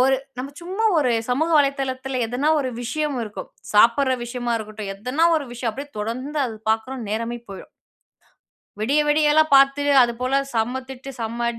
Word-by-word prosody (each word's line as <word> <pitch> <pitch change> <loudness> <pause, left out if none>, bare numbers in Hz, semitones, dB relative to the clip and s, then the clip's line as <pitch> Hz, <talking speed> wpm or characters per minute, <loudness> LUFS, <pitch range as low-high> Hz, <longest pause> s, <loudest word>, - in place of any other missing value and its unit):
ஒரு 265 +1 +4 0.2
நம்ம 265 +2 -4
சும்மா 380 +6 -3
ஒரு 255 -5 +2 0.2
சமூக 315 +7 +1
வலைதளத்தில, 270 -2 -1
எதனா 250 +6 -1
ஒரு 260 - -2
விஷயம் 295 +3 -2
இருக்கும். 210 -2 -7 0.2
சாப்பட்ற 235 +5 +5
விஷயமா 240 0 -3
இருக்கட்டும். 215 -2 -7
எதனா 250 +11 0
ஒரு 285 -3 -3
விஷயம். 240 -2 -3
அப்டியே 280 +4 -8
தொடர்ந்து, 255 +8 -3
அது 225 - -6 0.2
பார்க்குறோனு 225 +1 -2
நேரமே 230 +2 -2
போயிரும். 195 - -10 1.1
விடிய 280 +7 +2
விடியலாம் 305 +1 +4
பாத்து, 275 +1 +5 0.2
அதுபோல 250 +3 -1 0.2
செம்ம 240 +4 0
திட்டு, 265 +1 -8
செம்ம 230 +1 -2
255 Hz, 150 wpm, -22 LUFS, 230-280 Hz, 1.1 s, சாப்பட்ற